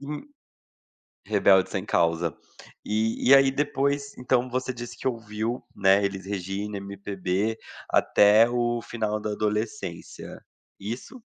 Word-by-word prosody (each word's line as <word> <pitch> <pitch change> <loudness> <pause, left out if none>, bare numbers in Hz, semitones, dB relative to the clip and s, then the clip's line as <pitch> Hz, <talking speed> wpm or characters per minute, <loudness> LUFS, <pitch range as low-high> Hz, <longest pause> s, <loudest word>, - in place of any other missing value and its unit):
Em 150 +1 -6 1.0
rebelde 100 -2 +4
sem 95 0 -3
causa. 85 -3 +1 0.5
E 110 +3 0
e - - +11
aí, 135 0 +5
depois, 140 0 -1
então, 125 0 +1
você 130 +1 -2
disse 120 0 -8
que - - -3
ouviu, 115 0 -3
né, 100 0 +4
Elis 95 -1 -4
Regina, 100 +1 -4
MPB 100 +1 -3 0.3
até 105 +3 +5
o 120 -1 0
final 110 -2 -3
da 105 0 -3
adolescência, 105 -2 -4 0.4
isso? 120 - -7
110 Hz, 120 wpm, -26 LUFS, 100-125 Hz, 1.0 s, e